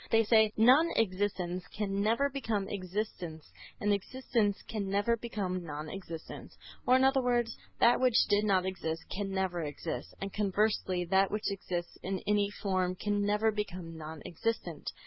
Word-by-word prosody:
They 225 0 +5
say 220 -1 +5
"non 260 +9 +6
existence 185 -3 0
can 200 -1 -2
never 230 +7 +3
become 225 -8 -2
existence 185 -5 -5 0.3
and 205 0 +2
existence 210 0 0
can 205 -3 -3
never 205 +4 +2
become 200 -6 -3
non 150 -1 -6
existence;" 170 -4 -8 0.3
or, 250 - +6
in 260 - +4
other 270 0 +4
words, 240 -2 +1 0.2
that 240 - +5
which 250 -2 +4
did 205 +1 +3
not 190 -3 +3
exist 165 -3 -3
can 200 0 -2
never 190 -2 -1
exist, 150 +1 -5
and 195 0 -5
conversely 200 -3 +1
that 190 +2 +3
which 210 -1 -1
exists 175 -3 -4
in 190 0 -2
any 205 -1 +2
form 185 -3 -1
can 205 +2 0
never 210 +2 +2
become 185 -5 -5
non 155 -1 -8
existent. 225 +7 -3
200 Hz, 160 wpm, -31 LUFS, 185-220 Hz, 0.3 s, non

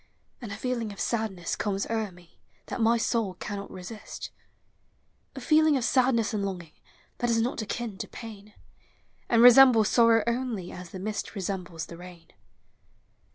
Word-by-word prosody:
And 230 -4 -7
a 200 - -5
feeling 235 -2 -2
of 200 - -11
sadness 215 -7 -2
comes 200 -2 -2
o'er 220 -1 -1
ine 180 -2 -17 0.4
That - - -5
my 230 +1 +4
soul 225 -5 -1
cannot 200 +2 -6
resist; 185 +4 -8 1.0
A - - -5
feeling 310 +2 +4
of 255 - -2
sadness 245 -3 +2
and 205 -2 -1
longing 180 -5 -5 0.5
That 240 - 0
is 230 -1 +2
not 235 +1 -1
akin 215 -1 -5
to - - -4
pain. 210 -3 -11 0.7
And 230 0 +5
resembles 245 -3 +8
sorrow 230 -2 +5
only 235 -6 -2
As 180 -1 -9
the 190 - -8
mist 205 +3 -4
resembles 180 -4 -4
the 170 - -11
rain. 175 -2 -13
215 Hz, 155 wpm, -27 LUFS, 190-235 Hz, 1.0 s, resembles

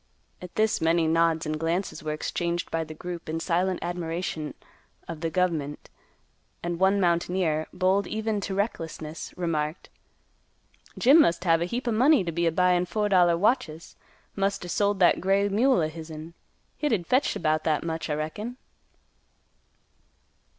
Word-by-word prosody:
At 180 -1 -10
this 215 0 +1
many 165 +1 +3
nods 165 0 +2
and 155 0 -2
glances 170 +4 -2
were 155 - -3
exchanged 170 +2 -2
by 165 0 0
the 155 0 -9
group 175 0 -7
in 160 +1 -2
silent 180 +2 0
admiration 170 -2 -4 0.5
of 165 -2 -7
the 165 - -1
"gov'ment," 160 -4 -2 0.7
and 170 0 -3
one 190 +1 +3
mountaineer, 170 -3 +1
bold 190 +2 +1
even 220 -1 -2
to 195 0 -3
recklessness, 165 -6 -4
remarked, 160 -2 -2 1.1
"Jim 280 +6 +7
must 170 - +2
have 165 -2 +3
a - - +1
heap 245 +7 -4
o' - - +2
money 260 +3 +4
t' 170 - -3
be 170 +1 0
a - - +2
buyin' 180 +1 +2
four 210 +4 -1
dollar 175 -3 +4
watches. 175 -6 0 0.4
Must 195 -2 -1
er - - -7
sold 205 +1 +1
that 175 - +5
gray 195 +2 +2
mule 230 +1 +3
o' 155 - +1
hisn; 160 0 -9 0.5
hit'd 225 - 0
fetch 260 +8 +1
'bout 155 0 +1
that 155 -2 0
much, 165 0 -4
I 150 - 0
reckon." 205 +11 -5
175 Hz, 155 wpm, -26 LUFS, 160-195 Hz, 1.1 s, Jim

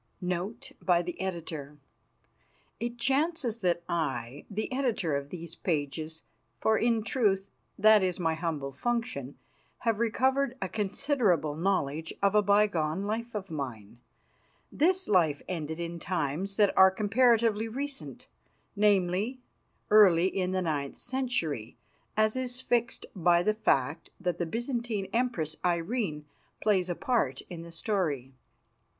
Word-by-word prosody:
NOTE 180 +4 -3
BY 175 -1 +3
THE 175 0 -6
EDITOR 160 -6 -5 1.0
It 240 +2 -3
chances 275 -2 +1
that 175 -4 +1
I, 135 -5 -3
the 215 +3 -3
Editor 235 - 0
of 140 0 -3
these 170 0 -7
pages 155 0 -3 0.4
for, 220 - +3
in 230 -1 +2
truth, 200 -5 +1 0.3
that 215 0 +6
is 185 -1 0
my 165 -2 +1
humble 160 -4 -3
function 230 - -3 0.4
have 225 -3 +1
recovered 260 +3 +1
a 190 - -2
considerable 205 - +1
knowledge 160 -3 -1
of 200 0 +3
a 210 - +5
bygone 200 -5 +2
life 225 +3 -3
of 195 -4 -5
mine. 120 -7 -6 0.7
This 370 +5 +2
life 165 -7 +3
ended 160 -2 -4
in 170 0 -4
times 180 +3 -2
that 205 -2 +4
are 190 0 +8
comparatively 225 +2 +3
recent, 275 +4 -6 0.5
namely, 205 +3 +2 0.5
early 190 -5 +7
in 185 -1 0
the 185 0 0
ninth 145 -4 -2
century, 240 - -2 0.4
as 215 +1 +3
is 250 -1 -3
fixed 240 -2 0
by 175 -1 +4
the 215 - +2
fact 150 -7 0
that 180 -1 -2
the 175 - -1
Byzantine 235 -2 -2
Empress, 225 -11 0
Irene, 170 -2 -1 0.3
plays 190 -4 +2
a 175 - -1
part 230 - 0
in 170 -2 -6
the 170 0 -10
story. 160 - -2
190 Hz, 130 wpm, -29 LUFS, 160-230 Hz, 1.0 s, are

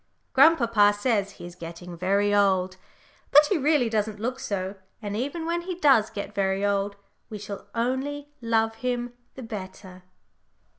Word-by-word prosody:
Grandpapa 235 -8 +5
says 205 -3 0
he - - -11
is 175 - -9
getting 170 0 -9
very 200 +4 +1
old, 190 -2 +2 0.5
but 295 +2 +7
he 390 - +3
really 290 -3 +3
doesn't 215 -1 -1
look 250 +4 -3
so, 190 -1 -3 0.3
and 205 -2 -5
even 285 +8 -3
when 340 +1 -1
he 360 +1 -5
does 270 -10 +4
get 205 0 -6
"very 195 0 0
old," 200 0 0 0.3
we 215 - -6
shall 205 -1 -8
all 230 - +1
only 290 +2 -4
love 225 -1 +1
him 245 0 -2 0.2
the 260 - -8
better. 190 -4 -8
215 Hz, 160 wpm, -26 LUFS, 195-255 Hz, 0.5 s, but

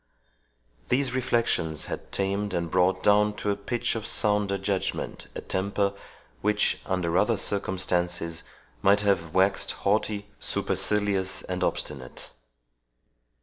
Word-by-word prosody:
These 135 0 +2
reflections 115 - 0
had - - -6
tamed 100 0 -1
and 85 -2 -2
brought 90 +1 +2
down 105 0 +4
to 105 - -1
a - - 0
pitch 100 +4 -1
of 115 -2 -4
sounder 105 -1 +2
judgment 95 0 -2
a - - -4
temper, 100 +1 0 0.5
which, 105 0 +2
under 90 -3 0
other - - +2
circumstances, 90 -4 -1 0.4
might 100 +1 +5
have 90 -6 0
waxed 95 +1 +3
haughty, 105 0 0
supercilious, 100 -3 0
and 90 0 -3
obstinate. 65 -7 -3
100 Hz, 115 wpm, -27 LUFS, 90-105 Hz, 0.5 s, might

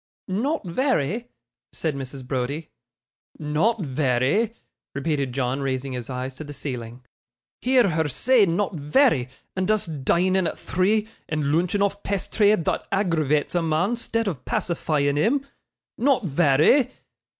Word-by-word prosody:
'Not 230 +8 -1
very,' 230 - 0 0.4
said 160 -2 -2
Mrs. 135 -1 -6
Browdie. 140 +4 -3 0.7
'Not 165 +9 0
vary!' 140 - +1 0.4
repeated 140 -2 -1
John, 130 +1 -1
raising 135 0 -2
his 125 -1 -5
eyes 130 +1 -4
to 140 - -8
the 145 -1 -8
ceiling. 125 -3 -6 0.6
'Hear 250 -3 +4
her 160 -3 +1
say 215 - +3
not 185 +4 0
vary, 150 - +2 0.3
and 185 +1 -1
us 215 -1 +2
dining 170 +4 +1
at - - -4
three, 210 +4 +1 0.2
and 155 -1 -1
loonching 180 +5 +2
off 200 0 -1
pasthry 205 +1 +2
thot - - -1
aggravates 160 -7 +1
a 175 - +2
mon 165 +8 +1
'stead 230 -1 -2
of 145 -10 -3
pacifying 145 -4 0
him! 265 - +2 0.5
Not 260 -1 +3
vary! 155 - +4
160 Hz, 135 wpm, -24 LUFS, 140-205 Hz, 0.7 s, Hear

